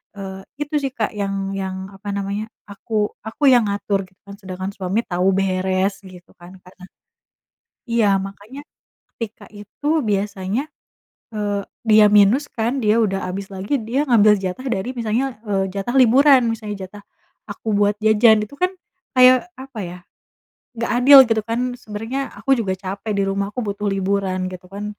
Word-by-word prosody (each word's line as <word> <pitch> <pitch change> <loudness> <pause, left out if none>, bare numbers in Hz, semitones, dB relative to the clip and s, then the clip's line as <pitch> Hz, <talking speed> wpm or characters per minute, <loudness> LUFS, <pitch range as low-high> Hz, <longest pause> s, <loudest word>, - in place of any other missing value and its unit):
eee, 190 -1 -7 0.2
itu 295 +1 -3
sih 270 - -1
Kak 225 -4 -2
yang 195 -1 -3
yang 190 -1 -3 0.2
apa 200 +1 -6
namanya 200 +1 -3 0.2
aku 205 +3 -11 0.3
aku 230 +6 -7
yang 245 -3 +6
ngatur 200 -1 -1
gitu 185 - -31
kan 200 - -9
sedangkan 190 -1 -6
suami 190 +3 -1
tahu 180 +1 0
beres 190 +1 0
gitu 180 -2 -14
kan 175 +1 -13
Kak 185 0 -19
nah. 185 - -12 1.0
Iya 230 -3 +2 0.2
makanya, 210 +7 -12 0.5
ketika 225 -2 -7
itu 205 +7 -13 0.2
biasanya, 200 +2 -1 0.7
eee, 205 -2 -2 0.2
dia 215 -1 +7
minus 210 +7 +5
kan 230 +1 -1
dia 210 +1 +3
udah 195 -4 +1
abis 195 +1 -5
lagi 190 +7 -4
dia 250 +4 0
ngambil 215 -3 +6
jatah 190 +9 -4
dari 195 +6 -4
misalnya, 230 +2 0 0.2
eee, 195 -2 +1
jatah 200 +6 -3
liburan 265 +2 +6
misalnya 215 -2 -5
jatah, 205 +2 -11 0.5
aku - - -11
buat 205 0 +2
jajan 220 +1 +5
itu 210 +7 -10
kan, 365 +1 +2 0.4
kayak 255 +5 +6 0.2
apa 265 -4 -10
ya. 175 +1 -8 0.8
Nggak 235 - -2
adil 275 +3 +8
gitu 225 -1 +2
kan 230 +1 -1 0.2
sebenernya 225 +5 -5 0.2
aku 270 - -4
juga 195 -4 -1
capek 200 +3 -4
di - - +2
rumah 195 0 -1
aku 250 - -3
butuh 200 +1 -4
liburan 195 -1 -1
gitu 180 0 -10
kan, 205 +1 -6
205 Hz, 165 wpm, -20 LUFS, 195-230 Hz, 1.0 s, adil